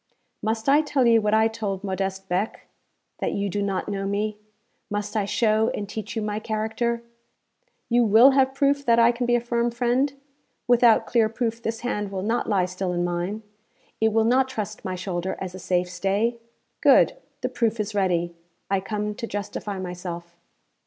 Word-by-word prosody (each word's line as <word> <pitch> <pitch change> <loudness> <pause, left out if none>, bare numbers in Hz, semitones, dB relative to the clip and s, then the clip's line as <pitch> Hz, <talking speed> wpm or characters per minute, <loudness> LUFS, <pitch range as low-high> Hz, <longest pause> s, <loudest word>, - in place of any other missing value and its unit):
'Must 220 +2 -2
I 285 +2 +6
tell 290 -4 +1
you 230 -1 +5
what 210 0 +2
I 220 0 +4
told 210 -4 -4
Modeste 195 0 -3
Beck 190 +4 -2 0.5
that - - -1
you 200 0 -1
do 205 +2 -2
not 195 -2 -2
know 195 -1 -2
me? 210 +1 -2 0.5
Must 205 +1 -3
I 210 -2 +1
show 220 +1 +2
and 205 - -4
teach 215 +1 -6
you 220 - -1
my 210 0 -2
character? 220 +2 -2 0.8
You 240 0 +3
will 225 +5 +7
have 265 0 +2
proof 280 0 +2
that 235 0 +5
I 235 0 +6
can 240 0 -3
be 240 - +3
a - - +3
firm 235 0 0
friend? 245 +4 +1 0.6
Without 240 -2 +5
clear 225 -2 +2
proof 230 0 -2
this 225 0 -3
hand 210 -5 -2
will 190 -1 -3
not 225 +3 -1
lie 195 -4 +2
still 185 0 -3
in 175 0 0
mine, 175 +5 -2 0.6
it 220 0 +3
will 225 +1 +3
not 260 +3 +3
trust 215 -4 -5
my 185 -2 -3
shoulder 180 0 -3
as 185 -2 -5
a 185 - -8
safe 180 0 0
stay? 205 +6 0 0.4
Good. - - +5 0.3
The 255 - -1
proof 230 -3 0
is 210 0 -2
ready. 175 -4 0 0.4
I 195 - +3
come 210 +2 -3
to 230 +2 -6
justify 205 0 -4
myself.' 175 -2 -6
215 Hz, 185 wpm, -24 LUFS, 195-235 Hz, 0.8 s, will